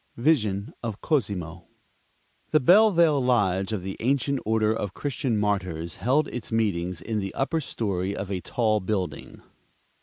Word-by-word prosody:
Vision 115 - +1
of 110 -3 -4
Cosimo. 95 - -2 0.8
The 155 - +4
Bellevale 170 - +5
lodge 95 -6 +1
of 105 -5 -3
the 95 0 -5
Ancient 140 +2 +1
Order 110 -1 +2
of 105 -4 -4
Christian 130 -5 -1
Martyrs 95 -5 -2
held 145 +5 +2
its 120 -2 -6
meetings 90 -6 -1
in 110 +2 -2
the 95 -1 -5
upper 160 +4 0
story 100 -7 -2
of 100 -1 -5
a 95 -2 -2
tall 110 0 +1
building. 95 -2 -4
110 Hz, 145 wpm, -26 LUFS, 95-130 Hz, 0.8 s, Bellevale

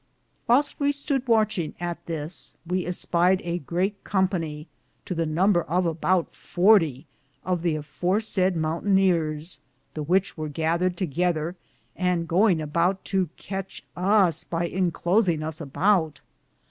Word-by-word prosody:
Whylste 275 +5 +3
we 285 0 +2
stood 280 -2 -2
wondringe 215 -8 +1
at 175 -1 -4
this, 160 0 -4
we 180 +1 -2
espied 180 +1 +2
a 170 0 -2
great 185 +6 -2
companye, 170 -6 -1 0.4
to - - -3
the 165 -2 -1
number 175 +4 +3
of 180 +3 0
aboute 170 +2 0
40, 175 - +3 0.4
of 180 -2 0
the 170 -2 0
afore 165 +6 -1
sayde 190 -4 0
mountayneares, 165 -1 0 0.3
the 155 - -4
which 185 +6 +1
weare 155 -1 -3
gathered 170 +4 0
together, 175 -1 -1 0.4
and 180 -2 0
goinge 175 -1 +3
aboute 175 +5 +1
to 190 -4 0
catche 195 0 -6
us 185 -4 +3
by 170 0 -2
inclosinge 175 -1 +1
us 160 0 -5
aboute. 160 0 +1
175 Hz, 135 wpm, -25 LUFS, 160-190 Hz, 0.4 s, Whylste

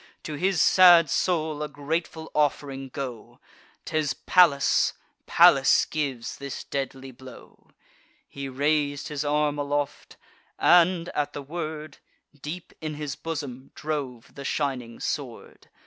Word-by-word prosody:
To 155 - -6
his 185 +4 0
sad 175 -5 +7
soul 155 -4 0
a 150 - -2
grateful 160 +3 -4
off'ring 140 -2 -1
go! 125 -4 -7 0.5
'Tis 155 -2 -1
Pallas, 165 -7 +3 0.3
Pallas - - +5
gives 135 -6 -4
this 140 -1 -6
deadly 135 -1 -5
blow." 130 +1 -15 0.6
He 140 -1 -7
rais'd 145 +1 0
his 150 -1 -3
arm 150 0 0
aloft, 145 0 -3 0.4
and, 175 0 +4
at 145 -1 -2
the 145 - -6
word, 155 0 -6 0.4
Deep 165 +4 -7
in 155 -1 -4
his 150 -2 -5
bosom 140 -5 -6
drove 140 -6 -5
the 140 - -9
shining 130 -5 -3
sword. - - -6
145 Hz, 120 wpm, -26 LUFS, 140-155 Hz, 0.6 s, sad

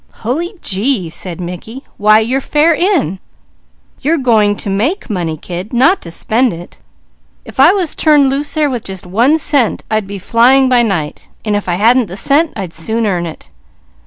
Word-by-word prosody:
"Hully 335 - -2
gee!" 195 -3 0
said 175 0 -7
Mickey. 180 +9 -7
"Why 215 +1 +4
your 255 +5 -1
fare 300 +5 +2
in! 325 - 0 0.8
You're 320 +4 +1
going 220 -6 +2
to - - -7
make 230 - -1
money, 170 -5 -2
kid, 180 - -7
not 270 +11 +3
to 170 - -9
spend 225 +7 0
it. 170 +1 -11 0.7
If - - -12
I - - +7
was 370 -6 -1
turned 295 -3 +3
loose 280 +4 -2
there 305 -1 +2
with 245 -5 -3
just 190 -2 -7
one 235 - +2
cent 285 -7 0
I'd 215 -2 0
be 200 0 -6
flying 245 +7 +3
by 250 -1 +4
night, 175 -10 -3 0.2
and 210 -1 0
if 205 -2 -3
I 175 - +1
hadn't 230 +4 +3
the 185 +2 -8
cent, 295 +9 +2
I'd 190 -5 -6
soon 220 +8 -2
earn 175 -4 -1
it." 160 - -11
225 Hz, 185 wpm, -14 LUFS, 190-275 Hz, 0.8 s, I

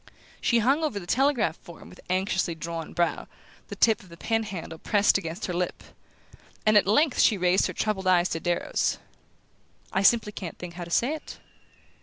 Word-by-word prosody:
She 235 - +2
hung 270 +8 +2
over 255 -10 -1
the 175 - -10
telegraph 255 - +1
form 170 -2 -13
with - - -15
anxiously 185 -2 0
drawn 165 0 -6
brow, 175 0 -1 0.4
the - - -7
tip 225 -2 +3
of 190 - -17
the 170 - -13
pen 225 +5 0
handle 175 -6 -7
pressed 205 -1 +2
against 170 +2 -5
her 180 - -3
lip; 180 +1 -3 0.8
and 215 0 +4
at 205 -2 +5
length 280 +7 +3
she 215 - +4
raised 180 +1 +2
her - - -5
troubled 195 -3 -2
eyes 180 -1 +4
to 165 - -2
Darrow's. 175 0 -1 1.0
"I 190 - +2
simply 210 +1 +4
can't 185 -5 -7
think 175 -1 -8
how 175 0 -6
to - - -11
say 240 - +1
it." 310 - -8
190 Hz, 190 wpm, -26 LUFS, 175-220 Hz, 1.0 s, at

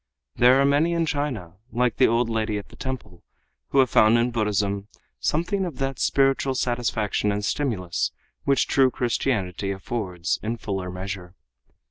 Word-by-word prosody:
There 125 +2 +6
are 140 - +4
many 145 +5 +3
in 170 -1 +1
China 130 - -3
like 125 -1 +1
the 130 - +6
old 115 +1 +2
lady 110 -2 -1
at 100 - -7
the - - -15
temple, 130 -10 -6 0.5
who - - -1
have 130 -2 +5
found 110 +2 +6
in 120 +1 +1
Buddhism 100 -3 0 0.3
something 175 - 0
of 170 -8 -4
that 135 -1 -2
spiritual 135 -1 +2
satisfaction 115 -4 0
and 105 0 -2
stimulus 100 -11 -1 0.3
which 140 -2 +2
true 135 -1 +4
Christianity 110 -7 -1
affords, 95 -3 -2
in 115 +2 -3
fuller 95 -4 -4
measure. 90 -1 -6
115 Hz, 155 wpm, -24 LUFS, 100-135 Hz, 0.5 s, There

